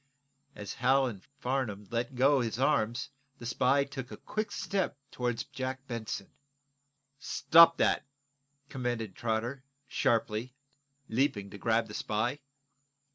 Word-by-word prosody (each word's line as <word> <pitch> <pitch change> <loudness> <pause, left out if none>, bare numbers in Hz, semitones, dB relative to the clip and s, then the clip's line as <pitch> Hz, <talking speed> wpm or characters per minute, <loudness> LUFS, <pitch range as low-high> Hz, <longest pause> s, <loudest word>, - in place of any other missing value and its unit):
As 105 -1 -6
Hal 135 +2 +3
and 105 -7 -5
Farnum 125 -7 -3
let 120 +2 -2
go 135 +2 +4
his 115 -1 -2
arms 125 -2 +1 0.3
the 120 - -9
spy 130 +4 +3
took 135 -2 -7
a - - -8
quick 215 0 -3
step 195 -8 -1
toward 125 -1 -2
Jack 130 -1 -4
Benson. 115 -5 -5 0.9
"Stop 165 +3 +6
that!" - - +2 0.6
commanded 120 -7 -3
Trotter, 120 +4 -2 0.2
sharply, 115 +1 0 0.5
leaping 110 -5 0
to 100 - -9
grab 115 +1 +2
the 105 - -10
spy. 115 +8 -1
125 Hz, 125 wpm, -31 LUFS, 110-135 Hz, 0.9 s, Stop